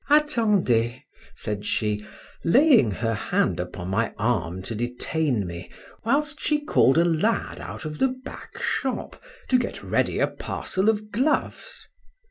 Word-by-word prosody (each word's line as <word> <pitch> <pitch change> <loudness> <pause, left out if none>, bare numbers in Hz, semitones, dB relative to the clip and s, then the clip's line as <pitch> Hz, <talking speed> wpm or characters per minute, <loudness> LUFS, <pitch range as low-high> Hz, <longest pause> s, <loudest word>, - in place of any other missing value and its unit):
—Attendez! 210 - +3 0.4
said 105 -1 -4
she, 105 0 -1 0.4
laying 255 - +5
her 115 +3 -1
hand 105 - 0
upon 90 0 -5
my 110 +4 0
arm 95 -5 -1
to 115 - -5
detain 125 +1 -1
me, 85 0 -7 0.3
whilst 300 +6 +1
she 300 -1 +1
called 135 - +4
a 170 - +5
lad 175 +7 0
out - - -7
of 150 -1 -5
the 265 - +4
back 255 0 -9
shop 265 -2 -2 0.3
to 255 - +4
get 240 - -4
ready - - 0
a - - +4
parcel 190 +3 -2
of 210 -1 -1
gloves. 295 - -1
160 Hz, 140 wpm, -25 LUFS, -, 0.4 s, laying